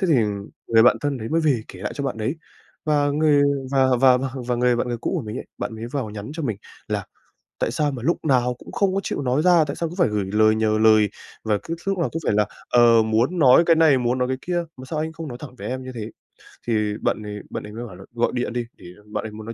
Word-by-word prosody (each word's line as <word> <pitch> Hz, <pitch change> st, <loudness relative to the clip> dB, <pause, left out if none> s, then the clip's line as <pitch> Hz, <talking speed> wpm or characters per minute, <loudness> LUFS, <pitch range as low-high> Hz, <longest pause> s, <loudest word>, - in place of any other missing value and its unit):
Thế 190 Hz, -, +1 dB
thì 160 Hz, -, +4 dB, 0.5 s
người 115 Hz, -1 st, +6 dB
bạn 120 Hz, -, +6 dB
thân 145 Hz, -3 st, -1 dB
đấy 110 Hz, -, -5 dB
mới 165 Hz, +1 st, +1 dB
về 140 Hz, -8 st, +2 dB
kể -, -, -11 dB
lại -, -, -3 dB
cho 140 Hz, -, -4 dB
bạn 130 Hz, -, -2 dB
đấy, 120 Hz, +9 st, -2 dB, 0.5 s
và 145 Hz, -2 st, +2 dB
người 145 Hz, -1 st, +3 dB, 0.3 s
và 135 Hz, -1 st, +4 dB
và 130 Hz, -2 st, +6 dB
và 135 Hz, +1 st, -2 dB, 0.2 s
và 125 Hz, -, 0 dB
người 125 Hz, 0 st, +2 dB
bạn 120 Hz, -, -1 dB
người 120 Hz, -, -2 dB
cũ -, -, -2 dB
của 155 Hz, -, -2 dB
mình 110 Hz, +2 st, -6 dB
ấy, -, -, -8 dB
bạn 110 Hz, -, -4 dB
mới 110 Hz, +1 st, -6 dB
vào 130 Hz, -7 st, -2 dB
nhắn 105 Hz, +4 st, -7 dB
cho 165 Hz, -, -4 dB
mình 110 Hz, -7 st, -2 dB, 0.3 s
là -, -, -2 dB, 0.5 s
"Tại -, -, 0 dB
sao 145 Hz, +4 st, 0 dB
mà 125 Hz, -4 st, -6 dB
lúc 170 Hz, +4 st, 0 dB
nào 125 Hz, -3 st, +2 dB
cũng -, -, -12 dB
không 195 Hz, -2 st, +1 dB
có 195 Hz, -, +1 dB
chịu -, -, -3 dB
nói 130 Hz, +4 st, +1 dB
ra? 175 Hz, -3 st, +5 dB
Tại 140 Hz, -1 st, -5 dB
sao 170 Hz, -, -2 dB
cứ 165 Hz, -, -9 dB
phải 175 Hz, -, +4 dB
gửi 105 Hz, -2 st, -1 dB
lời 110 Hz, +1 st, +4 dB
nhờ 110 Hz, 0 st, +1 dB
lời? 110 Hz, -2 st, +5 dB, 0.3 s
Và 105 Hz, -2 st, +1 dB
cứ 165 Hz, -, -4 dB
lúc 195 Hz, -1 st, 0 dB
nào 170 Hz, -, +1 dB
cũng 165 Hz, -, -4 dB
phải -, -, +2 dB
là, 105 Hz, -1 st, +3 dB, 0.2 s
ờ, 120 Hz, -2 st, +6 dB
muốn 115 Hz, +11 st, +1 dB
nói 135 Hz, +1 st, +7 dB
cái 165 Hz, -, +5 dB
này 155 Hz, -5 st, +5 dB
muốn 125 Hz, +1 st, 0 dB
nói 125 Hz, 0 st, 0 dB
cái 130 Hz, -, -1 dB
kia, 175 Hz, -1 st, -1 dB
mà 130 Hz, -, -10 dB
sao 155 Hz, +3 st, -4 dB
anh 160 Hz, +1 st, -2 dB
không 165 Hz, -2 st, -7 dB
nói 120 Hz, -, -7 dB
thẳng 130 Hz, -4 st, -9 dB
với -, -, -6 dB
em 130 Hz, +1 st, -4 dB
như 130 Hz, 0 st, -7 dB
thế?" 110 Hz, -1 st, -5 dB, 0.6 s
Thì 105 Hz, -2 st, +1 dB
bạn 105 Hz, -, -1 dB
ấy 105 Hz, 0 st, -6 dB
bạn -, -, -5 dB
ấy 105 Hz, 0 st, -9 dB
mới 120 Hz, +2 st, -6 dB
bảo 95 Hz, -, -11 dB
là 95 Hz, -, -12 dB
gọi 120 Hz, 0 st, +1 dB
điện 120 Hz, -1 st, -2 dB
đi 120 Hz, -1 st, -2 dB
để -, -, -15 dB, 0.3 s
bạn -, -, -2 dB
ấy 110 Hz, -, -6 dB
muốn 110 Hz, 0 st, -9 dB
nói 115 Hz, -, -6 dB
125 Hz, 290 wpm, -23 LUFS, 110-150 Hz, 0.6 s, nói